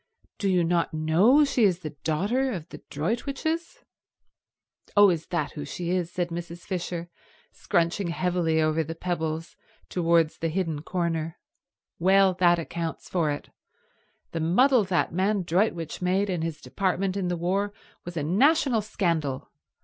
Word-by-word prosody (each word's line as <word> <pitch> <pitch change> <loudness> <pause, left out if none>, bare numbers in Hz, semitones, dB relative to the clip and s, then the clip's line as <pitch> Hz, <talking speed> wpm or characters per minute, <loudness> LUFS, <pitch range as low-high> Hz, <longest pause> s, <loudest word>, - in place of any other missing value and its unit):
Do 200 - +1
you 180 -2 +3
not 170 -1 0
know 185 - +4
she 275 -4 +1
is 185 -3 +3
the 155 -3 -5
daughter 200 - -1
of 170 -4 -6
the - - -9
Droitwiches?" 280 - -3 1.1
"Oh, 205 -2 +8
is 165 -2 -3
that 160 -5 -2
who 145 - -6
she 170 +4 -4
is," 180 -2 -1
said 175 -1 -2
Mrs. 170 0 -6
Fisher, 175 -2 -4 0.4
scrunching 170 +3 0
heavily 170 -2 0
over 155 +1 +2
the 165 +2 -6
pebbles 165 -1 -3 0.3
towards 165 -2 +2
the 165 - -1
hidden 165 -3 -2
corner. 165 -1 -2 0.6
"Well, 190 +2 +5
that 175 -1 +5
accounts 165 0 -5
for 170 -4 +1
it. 145 - -5 0.8
The 165 - -3
muddle 220 - +4
that 180 -3 0
man 195 +2 +1
Droitwich 170 -2 0
made 190 +2 +1
in 175 -3 -1
his 160 -2 -4
department 190 0 -1
in 195 -2 -1
the 175 -1 -1
war 195 +4 0 0.3
was 175 -1 -7
a 150 - -1
national 255 - +3
scandal. 165 -10 -2
175 Hz, 150 wpm, -26 LUFS, 165-195 Hz, 1.1 s, Oh